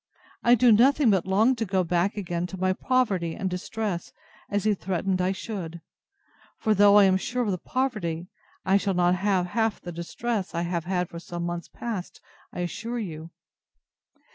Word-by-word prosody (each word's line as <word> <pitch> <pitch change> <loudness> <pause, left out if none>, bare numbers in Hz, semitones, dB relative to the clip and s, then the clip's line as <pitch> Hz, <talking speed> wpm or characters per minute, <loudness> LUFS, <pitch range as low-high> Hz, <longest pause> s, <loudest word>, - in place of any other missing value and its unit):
I 240 +1 +6
do 245 0 +5
nothing 255 +3 +5
but 190 -2 +1
long 220 +7 +3
to 225 - -1
go 190 -3 +1
back 180 +4 0
again 175 -3 -2
to 190 - -8
my 185 0 +1
poverty 195 -9 0
and 195 - -2
distress, 185 0 -3 0.4
as 205 -1 0
he 215 - +3
threatened 190 0 -1
I 180 +1 +1
should; 185 -4 -5 0.8
for 215 - +1
though 205 0 +6
I 205 - +8
am 190 -1 +4
sure 245 +6 -2
of 210 - 0
the 180 - -2
poverty, 210 -12 -2 0.4
I 190 +1 +4
shall 195 -1 -1
not 175 0 +3
have 190 -1 +1
half 220 +3 0
the 175 - -7
distress 190 +5 -3
I 170 - 0
have 170 -1 -2
had 180 -1 -1
for 170 - -8
some 175 0 -6
months 175 0 -4
past, 220 -7 -6 0.3
I'll 175 - -4
assure 230 +7 -4
you. 165 -7 -6
190 Hz, 185 wpm, -26 LUFS, 175-215 Hz, 0.8 s, I